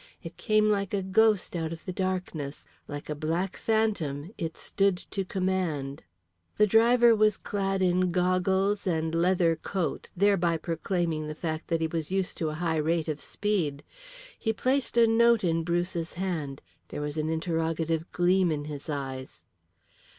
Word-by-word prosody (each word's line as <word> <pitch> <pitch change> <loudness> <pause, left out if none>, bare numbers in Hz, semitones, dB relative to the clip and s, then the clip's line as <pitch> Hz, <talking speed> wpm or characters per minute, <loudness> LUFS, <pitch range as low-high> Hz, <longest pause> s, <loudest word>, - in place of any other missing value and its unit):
It 165 - -8
came 215 -1 +2
like 200 -1 +1
a 195 - -1
ghost 210 0 +2
out 165 -1 -2
of 165 0 -8
the 185 - -4
darkness; 180 -6 -3 0.2
like 145 -1 -6
a 150 - -2
black 165 +5 -2
phantom 195 -9 -1
it 165 -4 -4
stood 195 -2 +1
to 195 +2 -4
command. 180 -8 -2 0.6
The 210 - +6
driver 230 +2 +5
was 215 -1 +3
clad 195 -1 -1
in 180 0 +2
goggles 190 +3 +1
and 160 -2 0
leather 170 0 +3
coat, 180 +2 -3
thereby 180 -4 +3
proclaiming 165 -1 -2
the 155 - -5
fact 155 -1 -4
that 165 -1 0
he - - +2
was 160 -1 -3
used 190 -1 -1
to 160 - 0
a 155 - -4
high 165 0 -1
rate 160 +1 0
of 150 -2 -3
speed. 170 -9 -1 0.6
He 220 - 0
placed 255 +3 0
a 235 - +7
note 230 0 +4
in 165 -2 +1
Bruce's 170 0 -1
hand; 165 -7 -3 0.2
there - - -6
was 150 0 -3
an 155 +1 -1
interrogative 165 0 -1
gleam 180 0 +3
in 145 -1 -2
his 150 0 -7
eyes. 130 - -5
175 Hz, 165 wpm, -28 LUFS, 160-195 Hz, 0.6 s, a